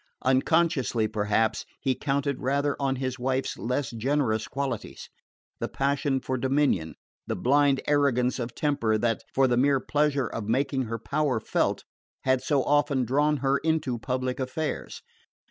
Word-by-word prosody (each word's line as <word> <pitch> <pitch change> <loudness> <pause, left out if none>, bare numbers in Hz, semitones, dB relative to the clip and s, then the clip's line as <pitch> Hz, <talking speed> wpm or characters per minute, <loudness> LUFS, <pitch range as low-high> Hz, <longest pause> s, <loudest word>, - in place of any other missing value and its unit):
Unconsciously 130 -4 +2
perhaps 105 +1 0 0.2
he 135 -2 +1
counted 140 0 -1
rather 140 +2 +1
on 135 -1 0
his 130 -1 -3
wife's 130 +1 -1
less 125 +2 -2
generous 115 -2 0
qualities: 140 0 -4 0.5
the - - -2
passion 140 0 0
for 130 0 -3
dominion, 130 - +1 0.3
the - - -1
blind 140 +1 +3
arrogance 130 -4 +2
of 120 -1 -4
temper 115 -8 +1
that, 115 +1 0
for 135 0 +3
the 120 -1 +1
mere 135 +1 +3
pleasure 145 -1 +1
of 115 -2 -5
making 130 +2 +1
her 115 0 -3
power 130 +2 0
felt, - - 0 0.4
had 130 -1 +2
so 135 0 +1
often 145 -3 +2
drawn 145 +5 +2
her 135 +1 +3
into 155 -6 0
public 130 +1 -2
affairs. 130 +4 -4
130 Hz, 145 wpm, -27 LUFS, 125-145 Hz, 0.5 s, blind